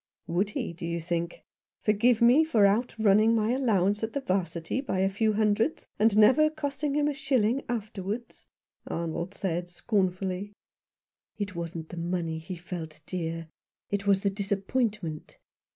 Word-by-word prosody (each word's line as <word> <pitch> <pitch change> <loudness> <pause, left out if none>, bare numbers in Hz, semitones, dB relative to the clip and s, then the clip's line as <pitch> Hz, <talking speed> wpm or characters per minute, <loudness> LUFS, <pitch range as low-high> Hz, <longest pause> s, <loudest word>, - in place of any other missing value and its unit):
" - - -61
Would 185 +4 0
he, - - -3
do 170 - -11
you 170 0 -2
think? 170 +1 -3 0.4
Forgive 225 +3 +3
me 250 +7 +7
for 230 -10 +4
outrunning 220 0 +3
my 220 0 +2
allowance 210 -6 +2
at 220 0 -3
the 280 - 0
'Varsity 185 -1 -1
by 255 -8 -2
a 195 - +3
few 215 +2 +1
hundreds, 215 +6 +1
and 215 -1 +4
never 260 +9 +6
costing 290 -2 -3
him 295 0 +2
a 295 - 0
shilling 270 -3 +1
after 215 -4 -3
wards," 215 +5 -6 0.4
Arnold 170 +3 -3
said 175 -3 -2
scornfully. 185 +1 -1 0.8
"It 205 -3 -4
wasn't 165 -1 -5
the 175 - -8
money 170 -1 -2
he 170 +3 -7
felt, 170 -3 -7
dear. 165 -2 -4 0.4
It 200 0 -1
was 195 -1 +3
the 200 - +2
disappointment. 200 -3 -2
200 Hz, 155 wpm, -28 LUFS, 175-230 Hz, 0.8 s, me